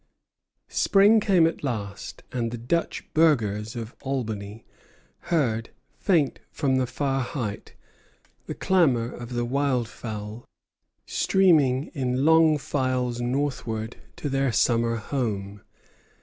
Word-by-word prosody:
Spring 205 +3 +4
came 190 -5 +4
at 165 -2 -2
last, 100 -7 -5
and 120 -2 -1
the 120 - -5
Dutch 125 +9 -2
burghers 115 -8 +2
of 115 0 -6
Albany 110 -6 -4 0.6
heard, 120 -9 +1 0.3
faint 165 -8 +2
from 130 -2 0
the 130 -1 +1
far 135 +2 -1
height, 120 -5 -5 0.7
the - - -4
clamor 135 -11 +2
of 120 0 -8
the 120 0 -1
wild 130 -2 0
fowl, 110 -1 -7 0.6
streaming 155 -7 +3
in 130 -2 -1
long 160 -1 +5
files 130 -4 -1
northward 120 -4 -2 0.2
to - - -4
their 135 -1 +1
summer 115 0 +2
home. 105 -5 -3
125 Hz, 115 wpm, -25 LUFS, 115-145 Hz, 0.7 s, long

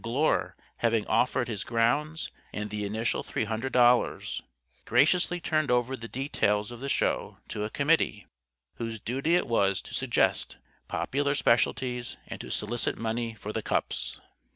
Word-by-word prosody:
Glure, 130 +7 +1 0.2
having 115 -2 +2
offered 125 -1 +2
his 110 -5 -3
grounds 140 +8 0 0.2
and 105 0 -4
the 105 -1 -2
initial 110 +3 0
three - - -2
hundred 110 +4 -2
dollars, 125 0 +3 0.4
graciously 175 +8 +3
turned 155 -3 0
over 125 +1 +2
the 115 -2 -8
details 110 -5 0
of 120 - -8
the 140 +2 -4
Show - - 0
to 105 - -2
a - - -3
committee, 140 - +1 0.5
whose 115 -1 -4
duty 135 +10 0
it 180 - +2
was 100 -5 +2
to - - -10
suggest - - +1 0.3
popular 140 +1 0
Specialties 125 0 +1
and - - -7
to - - -8
solicit 120 -1 -1
money 115 0 -2
for 105 0 -6
the 110 - -1
cups. 65 - -2
120 Hz, 155 wpm, -28 LUFS, 110-135 Hz, 0.5 s, dollars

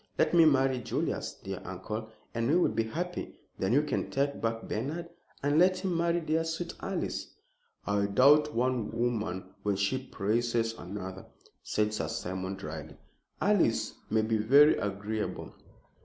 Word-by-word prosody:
Let - - +2
me 170 -2 +7
marry 135 -3 +3
Julius, 120 - -2
dear 95 -1 -5
uncle, 105 +4 -5 0.2
and 115 0 0
we 155 - +4
will 175 - +3
be 110 +1 0
happy. 175 +9 -4 0.2
Then 95 - +1
you 145 +5 +4
can 150 -3 -2
take 140 +1 -1
back 115 0 -1
Bernard 155 +10 -3 0.3
and 145 +2 +3
let 185 +1 +5
him 185 -1 -1
marry 170 +1 +2
dear, 160 +1 +1
sweet 165 +1 -3
Alice." 190 -2 -3 0.6
"I 100 0 +1
doubt 145 +7 +5
one 125 -2 +1
woman 105 -6 -2
when 105 -1 0
she 100 +7 0
praises 115 0 0
another," 95 -1 -7 0.3
said 105 0 0
Sir 105 - -2
Simon, 95 +1 -3
dryly. 80 -4 -7 0.4
"Alice - - +2 0.2
may 110 - +2
be 110 0 +1
very 140 +8 +6
agreeable." 105 +2 -3
115 Hz, 155 wpm, -30 LUFS, 105-150 Hz, 0.6 s, me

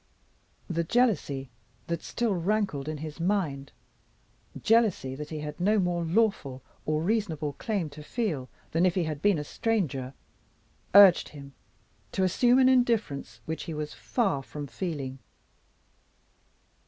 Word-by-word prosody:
The 170 -2 -1
jealousy 165 - +1 0.3
that 170 -1 -3
still 235 -3 -1
rankled 185 -5 -1
in 155 - -3
his 155 +1 -7
mind 165 -7 -1 0.9
jealousy 220 - +2
that 150 +2 -7
he 155 -2 -5
had 150 +1 -6
no 210 +5 +3
more 175 -3 +1
lawful 165 - 0 0.2
or 155 +1 +1
reasonable 170 -8 -1
claim 200 -4 -2
to 150 +1 -10
feel 150 - -3 0.2
than 165 +2 +2
if 185 -2 +3
he 185 - +2
had 155 -3 -4
been 205 -2 +3
a 150 - -3
stranger 145 - -2 0.8
urged 200 -3 +8
him 140 -2 -11 0.6
to 190 - +1
assume 240 +7 +4
an 260 -1 +6
indifference 225 - +1
which 160 0 -4
he 165 - -5
was 150 0 -4
far 195 - 0
from 145 +2 -7
feeling. 135 -1 -5
165 Hz, 140 wpm, -28 LUFS, 145-205 Hz, 0.9 s, urged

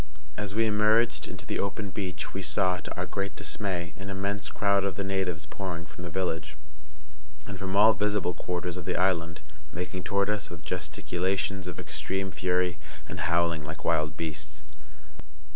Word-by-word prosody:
As 100 +1 -3
we 115 0 +4
emerged 110 +2 +4
into - - -7
the - - -1
open 100 +1 -1
beach 95 -3 -3
we 95 - -2
saw, 95 0 +3
to 90 - -6
our 90 - 0
great 100 +1 -2
dismay, 90 -5 -1
an 95 0 -5
immense 100 +1 -1
crowd 100 -1 +3
of 100 -2 0
the 100 - -1
natives 95 -5 0
pouring 85 +1 -4
from 85 +1 -10
the 90 - -3
village, 80 -4 -1 0.9
and 100 -2 -6
from 95 0 -2
all 110 +2 +8
visible 105 -2 +1
quarters 90 +1 -2
of 90 - -5
the - - 0
island, 85 -3 +2 0.3
making 90 +2 -3
toward 100 0 +2
us 105 -1 0
with 85 -1 -9
gesticulations 95 +1 -1
of 90 - -5
extreme 95 0 -2
fury, 90 -1 +1 0.3
and - - -5
howling 85 -1 +3
like 80 +2 -7
wild 75 -1 +2
beasts. 75 -1 -4
95 Hz, 170 wpm, -29 LUFS, 85-100 Hz, 0.9 s, all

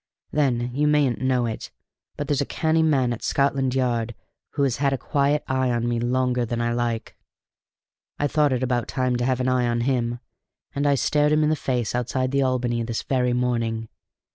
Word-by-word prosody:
Then, 125 -5 +1
you 150 +3 +1
mayn't 145 -5 +2
know 130 -2 +1
it, 110 -2 -5 0.5
but 145 - -3
there's 145 -2 +1
a - - 0
canny 160 0 +1
man 135 -6 +2
at 115 - -7
Scotland 135 -2 +1
Yard 120 -3 0 0.4
who 145 - 0
has 130 -4 +1
had 140 -1 +1
a - - 0
quiet 145 +3 +1
eye 130 -1 +1
on 120 -1 0
me 120 -1 0
longer 125 +1 +1
than 120 0 -3
I 120 0 0
like. 120 -1 -2 1.0
I 145 - 0
thought 150 0 +2
it 130 0 0
about 125 -2 0
time 130 -1 0
to 120 - -1
have 130 0 +1
an 130 - 0
eye 125 -1 +2
on 120 0 0
him, 120 -2 0 0.5
and 140 +1 0
I 140 - +4
stared 150 +3 +2
him 155 0 +3
in 150 - +2
the - - +2
face 125 -6 -2
outside 130 +1 -1
the 140 0 +2
Albany 125 -3 0
this 115 -1 -3
very 125 -2 +1
morning. 115 -2 -1
125 Hz, 205 wpm, -24 LUFS, 120-140 Hz, 1.0 s, I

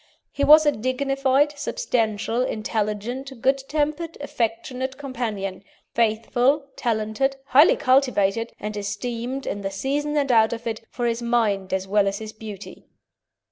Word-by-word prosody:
He 280 - -2
was 310 +2 +8
a 295 - +5
dignified, 270 +3 +1
substantial, 235 - -1
intelligent, 225 +3 -3
good 270 +3 +2
tempered, 305 +3 -1
affectionate 255 0 -3
companion, 220 -9 -4 0.3
faithful, 240 +5 +2
talented, 225 +3 0
highly 285 +3 +6
cultivated, 245 -6 +2
and 210 0 -5
esteemed, 235 +6 -4
in 200 - -3
the 195 - -2
season 285 +9 -2
and 280 -2 +2
out 220 -1 +4
of 235 +1 -7
it, 225 -1 -3
for 245 - -3
his 235 0 0
mind 220 -5 0
as 190 0 -1
well 200 0 +3
as 195 0 -1
his 215 0 -7
beauty. 210 -2 -10
235 Hz, 140 wpm, -23 LUFS, 215-275 Hz, 0.3 s, was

